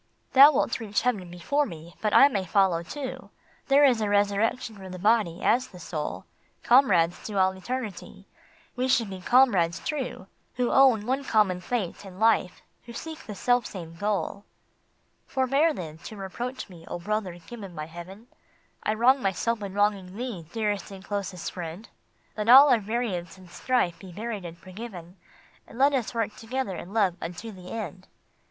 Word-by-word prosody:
Thou 275 +3 +10
wilt 245 - 0
reach 210 -3 -1
heaven 210 -8 -1
before 280 +12 0
me, 165 0 -10
but 215 - +1
I 275 - +8
may 205 -9 -1
follow 185 -2 +2
too. 265 - -7 0.4
There 285 +1 +6
is 245 -5 +3
a 210 - 0
resurrection 205 +3 +1
for 190 -2 -10
the 185 - -7
Body, 205 -3 +1
as 255 +2 +3
the 180 - -13
Soul; 155 -3 -5 0.4
Comrades 190 -10 +4
to 210 -2 -4
all 190 0 +4
eternity, 220 +2 -6 0.5
we 255 0 0
should 230 -5 +2
be 190 -1 -7
comrades 195 -8 +3
true 270 -10 -4 0.3
Who 250 -1 0
own 255 -6 +5
one 265 +3 -1
common 205 -7 +2
fate 205 -3 -3
and 190 -1 -11
life, 220 -5 +2 0.2
who 235 - -10
seek 320 +5 -7
the 210 - -6
self 245 +3 +1
same 170 -4 -8
goal. 205 +1 -2 0.4
" - - -43
Forbear, 275 +5 +2
then, 160 - -7
to 215 - -9
reproach 240 +7 -5
me, 175 -4 -14
O - - -4
brother 195 -1 -3
given 195 +1 -10
by 155 - -4
Heaven! 175 +7 -10 0.6
I 215 - 0
wrong 255 +4 +4
myself 215 +3 -1
in 200 -1 -6
wronging 200 -2 0
thee, 225 -10 -5
dearest 210 -3 -2
and 195 -1 -11
closest 195 -4 -4
friend! 175 +4 -7 0.5
Let 215 +1 -2
all 275 +4 +10
our 240 - +5
variance 205 -5 -3
and 185 -1 -15
strife 215 -9 0
be 190 -2 -11
buried 210 0 -5
and 170 0 -8
forgiven, 185 -1 -10 0.5
And - - -13
let 280 +2 +4
us 250 -3 -1
work 225 -2 -1
together 230 -3 -3
in 180 - -8
love 200 -5 +1
unto 180 +7 -6
the 185 -2 -11
end." 185 -4 -6
205 Hz, 175 wpm, -26 LUFS, 180-240 Hz, 0.6 s, Thou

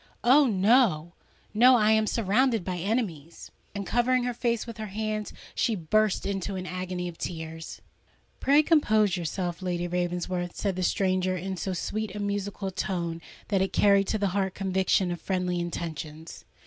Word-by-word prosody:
Oh! 270 +4 +6
no—no: 215 +2 +2
I 215 -2 +4
am 220 0 +3
surrounded 230 0 +1
by 185 -1 -2
enemies!" 175 - -3 0.2
And 200 -1 -3
covering 245 +3 +2
her 245 0 -1
face 235 -1 -1
with 230 -2 -8
her 215 - -4
hands, 215 +1 -3 0.2
she 230 - +1
burst 210 +4 +1
into 195 0 -2
an 185 -1 -4
agony 180 -1 -4
of 170 -2 -9
tears. 160 -1 -6 0.6
"Pray 285 +3 +4
compose 215 - +3
yourself, 175 +1 -3
Lady 175 -1 -2
Ravensworth," 175 0 -2
said 195 -3 -1
the 185 - -3
stranger, 185 -1 +1
in 190 +2 -4
so 185 +2 -3
sweet 210 +3 -3
and 205 -1 -3
musical 200 -1 -3
a - - -9
tone 170 -3 -3 0.3
that 195 -3 +2
it 190 - -1
carried 200 -1 +4
to 220 - 0
the 200 -2 0
heart 190 0 -1
conviction 190 -1 +1
of 175 - -5
friendly 180 -2 -1
intentions. 160 -2 -6
190 Hz, 165 wpm, -27 LUFS, 175-215 Hz, 0.6 s, Oh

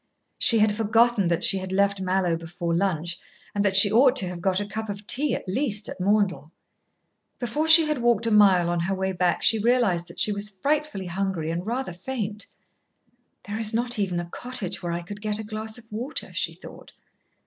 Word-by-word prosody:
She 230 - +5
had 215 0 +3
forgotten 225 -1 +2
that 170 +1 0
she 195 - +4
had 185 0 -7
left 200 0 +1
Mallowe 185 -2 0
before 170 +1 -4
lunch, 170 -2 -2 0.3
and 205 - 0
that 195 -2 +1
she 200 +1 +8
ought 250 +4 +4
to 195 -9 +1
have 175 -1 -7
got 190 +1 +1
a 205 - -3
cup 220 +2 -6
of 200 0 -7
tea, 275 +4 +1
at - - -8
least, 210 0 -1
at - - -8
Maundell. 185 -6 0 0.9
Before 260 +6 -2
she 320 0 +9
had 300 -3 -2
walked 235 -1 +2
a 230 - 0
mile 195 -5 +5
on 175 - -1
her 190 +3 -1
way 190 0 -2
back, 180 -1 0
she 225 - +4
realised 210 -7 +1
that 170 - -12
she 215 - +2
was 205 0 -1
frightfully 275 0 -2
hungry 180 -3 -3
and 175 +4 -5
rather 245 -4 -3
faint. 210 +2 -5 1.0
"There 205 +2 -6
is 220 0 0
not 240 0 -1
even 185 -4 -1
a 175 - -4
cottage 240 +2 -5
where 175 - -4
I 170 0 -4
could 205 +4 -9
get 210 -1 -2
a 220 - -6
glass 215 +1 -5
of 225 -2 -16
water," 245 +8 -4
she - - -2
thought. - - -14
205 Hz, 210 wpm, -24 LUFS, 180-225 Hz, 1.0 s, she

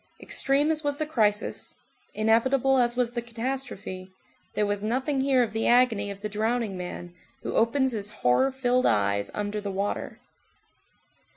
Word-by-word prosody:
Extreme 280 +3 +1
as 315 0 -2
was 290 -1 -1
the 310 - -1
crisis, 215 -8 -1 0.4
inevitable 255 +5 +3
as 240 -1 +2
was 245 -2 +1
the 240 -1 -3
catastrophe, 235 -6 -5 0.5
there 210 - +2
was 205 0 -1
nothing 265 +6 0
here 265 -2 +3
of 220 -2 -4
the 225 - 0
agony 235 -5 +3
of 200 0 -8
the 210 - -2
drowning 220 0 -1
man, 180 -1 -7 0.3
who - - -3
opens 265 +4 +2
his 210 -3 -3
horror 210 - +2
filled 255 -1 +1
eyes 100 -1 +1
under 210 0 -3
the 205 - -4
water. 195 +1 -3
230 Hz, 160 wpm, -26 LUFS, 205-260 Hz, 0.5 s, inevitable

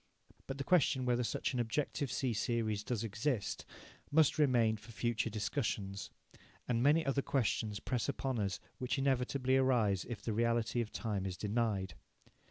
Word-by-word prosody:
But 135 - -4
the 140 - -2
question 140 -6 +3
whether 125 0 +2
such 115 - -1
an 125 - -1
objective 135 +3 -1
C 130 -3 0
series 110 -1 0
does 115 -1 -2
exist, 110 0 -2 0.4
must 155 0 +4
remain 120 -6 +4
for 115 - -13
future 115 0 -1
discussions. 105 -3 -2 0.6
And 120 -2 +1
many 150 +5 +4
other 140 0 +1
questions 110 -6 0
press 125 +3 -1
upon 135 -3 -1
us 100 -3 -1 0.2
which 130 +2 -1
inevitably 130 -1 +2
arise 115 -8 +3
if 110 -3 -5
the 115 - -1
reality 115 +1 +1
of 110 - -4
time 100 -4 -2
is 95 -1 -5
denied. 105 -4 -1
120 Hz, 160 wpm, -35 LUFS, 110-130 Hz, 0.6 s, must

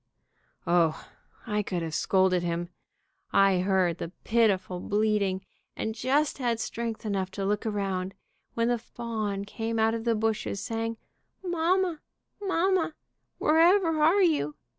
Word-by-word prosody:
O, 170 -2 +2 0.4
I 210 -3 0
could 180 -4 -3
have 160 -1 -4
scolded 185 +1 +2
him. 170 0 -2 0.6
I 195 -2 +4
heard 185 -2 +1
the 165 - -5
pitiful 195 -6 +2
bleating, 205 -2 0 0.3
and 220 - -2
just 280 +6 0
had 240 -3 0
strength 230 -1 -4
enough 195 -3 -1
to 195 - -1
look 210 +2 0
around, 195 -2 -2 0.4
when 230 0 +1
the 240 -1 +1
fawn 220 -4 -4
came 225 +2 -3
out 220 0 +3
of 230 -1 -3
the 230 -1 +2
bushes, 215 -2 -1
saying, 225 +1 -3 0.5
'Mamma! 350 -1 +1 0.4
Mamma! 375 -4 +1 0.4
Wherever 330 0 +4
are 350 +6 +5
you?' 290 - +1
220 Hz, 135 wpm, -28 LUFS, 190-255 Hz, 0.6 s, are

